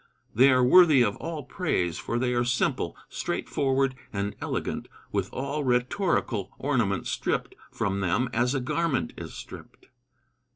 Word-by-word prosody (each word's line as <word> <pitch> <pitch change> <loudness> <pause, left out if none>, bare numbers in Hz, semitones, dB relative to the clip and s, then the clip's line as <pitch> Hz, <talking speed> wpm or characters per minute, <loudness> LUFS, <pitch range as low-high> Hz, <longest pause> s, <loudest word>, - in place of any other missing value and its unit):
"They 130 +5 +6
are 130 -1 +4
worthy 155 -1 +7
of 105 -3 0
all 160 -3 -5
praise, 90 - -1
for 115 - -2
they 125 0 0
are 120 0 +2
simple, 130 +2 0
straightforward 135 -1 0 0.2
and 100 0 -3
elegant, - - -3 0.2
with - - -1
all 140 +3 -3
rhetorical 125 - 0
ornament 120 -9 0
stripped - - -2 0.2
from 100 0 -2
them 95 +7 +1
as 125 +4 +1
a - - +1
garment 155 +1 -1
is - - -8
stripped." - - -11
130 Hz, 140 wpm, -27 LUFS, 115-140 Hz, 0.2 s, worthy